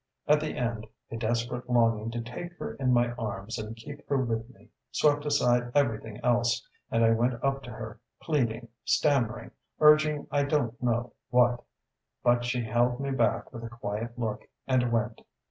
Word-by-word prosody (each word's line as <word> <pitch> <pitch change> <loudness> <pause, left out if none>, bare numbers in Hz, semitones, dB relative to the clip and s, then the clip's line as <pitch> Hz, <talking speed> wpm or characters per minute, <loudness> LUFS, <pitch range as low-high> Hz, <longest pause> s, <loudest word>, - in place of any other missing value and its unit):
At 150 0 +5
the 155 0 -3
end 115 -4 -2 0.2
a - - -4
desperate 120 +2 -2
longing 115 -2 +3
to 120 0 -3
take 170 +10 -7
her - - -5
in 130 -2 0
my 120 -1 +3
arms 110 0 -4
and 110 +1 -5
keep 145 +6 -11
her 140 - +2
with 115 -2 -1
me 130 - -19 0.2
swept 145 0 +2
aside 120 -4 +2
everything 115 -6 +1
else, 120 -1 +2 0.2
and 115 0 +3
I 115 - +5
went 120 +2 +2
up 135 0 +1
to - - -8
her, 110 -1 -8 0.2
pleading, 120 -6 -1
stammering, 125 -4 +1 0.3
urging 150 -1 +5
I 145 -1 +2
don't 130 -5 0
know 120 0 0 0.2
what.... 120 -1 +3 0.6
But 120 0 +3
she 120 0 0
held 120 +2 +1
me 140 0 -2
back 135 - 0
with 115 -1 -7
a 115 - -5
quiet 115 0 -5
look, 110 -3 -3 0.2
and 125 -2 +2
went. 115 0 -1
120 Hz, 175 wpm, -28 LUFS, 115-135 Hz, 0.6 s, At